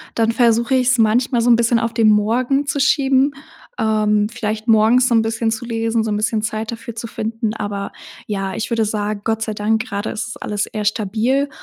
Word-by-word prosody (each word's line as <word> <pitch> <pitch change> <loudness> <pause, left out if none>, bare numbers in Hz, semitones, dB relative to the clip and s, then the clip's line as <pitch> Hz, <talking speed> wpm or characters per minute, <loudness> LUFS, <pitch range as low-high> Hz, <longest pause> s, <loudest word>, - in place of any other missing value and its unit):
Dann 225 0 +2
versuche 235 +2 +2
ich's 255 0 +3
manchmal 235 +2 +2
so 245 - +2
'n 235 - +7
bisschen 235 0 +2
auf 230 0 -2
den 225 -2 +4
Morgen 240 +7 +2
zu 285 - -1
schieben. 275 0 +3 0.5
Ähm, 210 -1 +2
vielleicht 220 -1 -4
morgens 225 +3 +4
so 235 - +2
'n 225 - +5
bisschen 225 0 -1
zu 225 +2 -3
lesen, 225 -1 -1
so 220 - -2
'n 210 - 0
bisschen 215 0 0
Zeit 220 +1 -3
dafür 230 0 -7
zu 230 0 -5
finden, 225 0 -3
aber 205 -2 -4 0.4
ja, 195 -2 -3
ich 225 - -4
würde 225 -2 +1
sagen: 210 -1 -3
„Gott 225 0 -1
sei 220 -1 -2
Dank, 220 +2 0
grade 200 +1 -3
ist 215 - -4
es 235 - -8
alles 205 -1 -2
eher 215 -1 -5
stabil“ 225 +7 0
225 Hz, 210 wpm, -19 LUFS, 215-235 Hz, 0.5 s, n